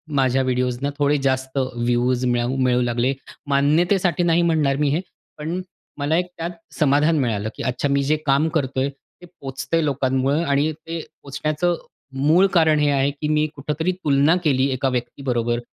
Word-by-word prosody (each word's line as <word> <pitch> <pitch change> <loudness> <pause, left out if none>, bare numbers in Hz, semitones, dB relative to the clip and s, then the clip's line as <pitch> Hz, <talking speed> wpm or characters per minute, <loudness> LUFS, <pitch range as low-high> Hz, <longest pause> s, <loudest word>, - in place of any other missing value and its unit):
माझ्या 135 -1 +2
व्हिडिओसना 125 +1 -1
थोडे 145 0 +2
जास्त 130 0 -1
व्ह्यूज 125 0 0
मिळू 120 +1 0
मिळू 125 -2 +2
लागले. 120 +2 0 0.4
मान्यतेसाठी 170 +5 +2
नाही 170 0 +3
म्हणणार 155 -5 +2
मी 145 0 +1
हे, 155 +5 0 0.4
पण 165 +5 -3 0.4
मला 145 +3 +1
एक 180 - +1
त्यात 170 +1 -3 0.3
समाधान 150 +2 +3
मिळालं, 110 -5 -1
की - - -6
अच्छा, 130 +3 -1
मी 140 0 +2
जे 150 +3 +2
काम 140 +3 +3
करतोय, 135 -1 -1
ते 140 +5 -18
पोहोचतंय 165 -1 -3
लोकांमुळे 135 +1 +1
आणि 145 0 +1
ते 165 +2 -7 0.2
पोहोचण्याचं 155 +5 -1 0.5
मूळ 175 +5 +5
कारण 160 -3 +4
हे 150 0 +2
आहे, 140 0 +2
की 150 +2 -5
मी 155 0 +2
कुठेतरी 150 +5 -2
तुलना 155 -3 +2
केली 135 -4 +2
एका 130 +1 0
व्यक्तीबरोबर 120 -1 -2
140 Hz, 160 wpm, -22 LUFS, 130-155 Hz, 0.5 s, मूळ